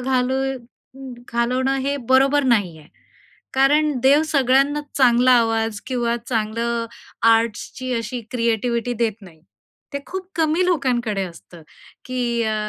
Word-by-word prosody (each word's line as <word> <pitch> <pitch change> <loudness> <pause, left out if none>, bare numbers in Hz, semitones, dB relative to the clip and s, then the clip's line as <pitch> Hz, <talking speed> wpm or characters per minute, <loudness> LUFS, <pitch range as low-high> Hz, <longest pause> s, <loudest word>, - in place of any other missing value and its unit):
घालू 255 0 0
अं, 265 0 -8 0.2
घालवणं 255 +3 0
हे 280 0 0
बरोबर 270 +2 +4
नाही 185 -7 -2
आहे. 150 - -17 0.7
कारण 295 +3 +3
देव 280 +3 +5
सगळ्यांनाच 275 0 +2
चांगला 250 -1 +5
आवाज 225 -2 0
किंवा 240 -2 -1
चांगलं 230 +1 -1 0.5
आर्ट्सची 230 +3 -2
अशी 230 +1 -3
क्रिएटिविटी 235 0 -1
देत 220 -1 -4
नाही. 170 -5 -15 0.5
ते - - 0
खूप 375 0 -6
कमी 325 +2 +2
लोकांकडे 245 - 0
असतं, 170 -1 -12 0.4
की 245 -2 -1
अ 220 -1 0
245 Hz, 125 wpm, -21 LUFS, 230-270 Hz, 0.7 s, देव